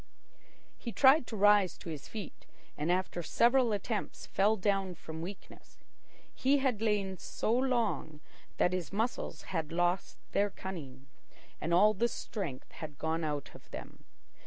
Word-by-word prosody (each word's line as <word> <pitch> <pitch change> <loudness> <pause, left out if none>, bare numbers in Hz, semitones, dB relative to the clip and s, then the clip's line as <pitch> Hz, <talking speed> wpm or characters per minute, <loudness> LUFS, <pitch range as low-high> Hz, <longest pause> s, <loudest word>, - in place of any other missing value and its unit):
He 235 - -5
tried 265 +2 +6
to - - -5
rise 205 -3 +5
to - - -11
his 150 -3 -7
feet, 210 -6 -8 0.3
and 150 +4 0
after 180 -1 0
several 240 +6 +3
attempts 210 +1 -3
fell 205 +3 +3
down 195 -2 0
from 160 0 -7
weakness. 185 +3 -9 0.6
He 275 +2 +3
had 260 -6 0
lain 200 -4 0
so 220 - -1
long 235 - 0 0.4
that 180 - +3
his 185 -3 -2
muscles 225 +5 -2
had 160 -3 -1
lost 175 +2 0
their 205 +1 +2
cunning, 145 -10 -7 0.6
and 165 - -2
all 205 +5 +6
the 230 +4 +2
strength 190 - -5
had 150 -3 -8
gone 160 +2 -1
out 150 -2 -3
of - - -15
them. - - -9
195 Hz, 150 wpm, -32 LUFS, 165-220 Hz, 0.6 s, tried